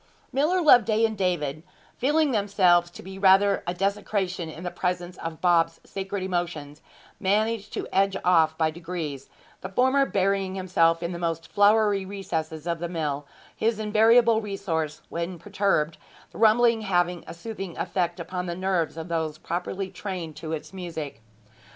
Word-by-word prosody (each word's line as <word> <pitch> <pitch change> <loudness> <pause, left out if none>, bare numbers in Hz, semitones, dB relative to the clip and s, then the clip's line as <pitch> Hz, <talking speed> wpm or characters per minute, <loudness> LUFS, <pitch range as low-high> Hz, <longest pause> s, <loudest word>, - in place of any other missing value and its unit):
Miller 330 +7 +2
Loveday 225 -6 +5
and 220 -1 -1
David, 165 -7 -1 0.3
feeling 295 +3 +2
themselves 190 -5 +3
to - - -12
be 190 +1 -9
rather 195 +1 +5
a 175 - 0
desecration 195 -3 -1
in 160 +2 -9
the 180 - -3
presence 180 -1 -2
of 165 -1 -6
Bob's 170 -2 +3
sacred 195 0 -5
emotions, 175 -5 -3 0.4
managed 210 +2 0
to - - -3
edge 195 0 +2
off 160 -3 +4
by 160 -1 +2
degrees, 160 -5 -6 0.3
the 185 - -6
former 260 +7 +3
burying 195 -1 0
himself 170 -3 +2
in 170 - -2
the 170 - -5
most 165 -1 -2
floury 205 -1 +4
recesses 170 -5 -4
of 170 -1 -2
the 170 0 -3
mill, 145 -4 -3 0.3
his 225 0 0
invariable 220 +2 +4
resource 165 -7 -3
when 170 +2 -4
perturbed, 190 -5 0 0.3
the - - -11
rumbling 225 +1 +4
having 175 -4 0
a - - -7
soothing 195 -1 -7
effect 175 -2 -1
upon 180 +1 -4
the 170 - -3
nerves 180 -3 -1
of 160 +1 -5
those 160 -2 -2
properly 185 +4 -4
trained 180 -4 -6
to 155 +1 -7
its 160 +3 -5
music. 160 -9 -6
185 Hz, 155 wpm, -26 LUFS, 165-205 Hz, 0.4 s, Loveday